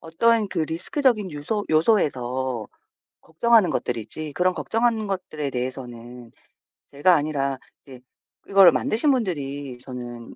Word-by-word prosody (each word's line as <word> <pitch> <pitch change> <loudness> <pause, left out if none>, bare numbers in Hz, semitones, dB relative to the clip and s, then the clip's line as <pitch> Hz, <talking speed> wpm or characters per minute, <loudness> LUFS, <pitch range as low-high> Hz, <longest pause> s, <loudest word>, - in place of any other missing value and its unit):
어떤 215 +6 +1
그 - - -2
리스크적인 205 - 0
유서 150 +9 -3
요소에서 130 - +1 0.5
걱정하는 210 +2 +3
것들이지 130 +5 -3
그런 180 0 +1
걱정하는 225 -1 0
것들에 155 -7 -4
대해서는 125 -2 -7 0.6
제가 160 +6 +3
아니라 140 -3 -1 0.3
이제 130 -2 -13 0.5
이거를 195 -3 +7
만드신 240 - +1
분들이 145 - -3
저는 120 -2 -9
155 Hz, 305 characters per minute, -23 LUFS, 130-200 Hz, 0.6 s, 이거를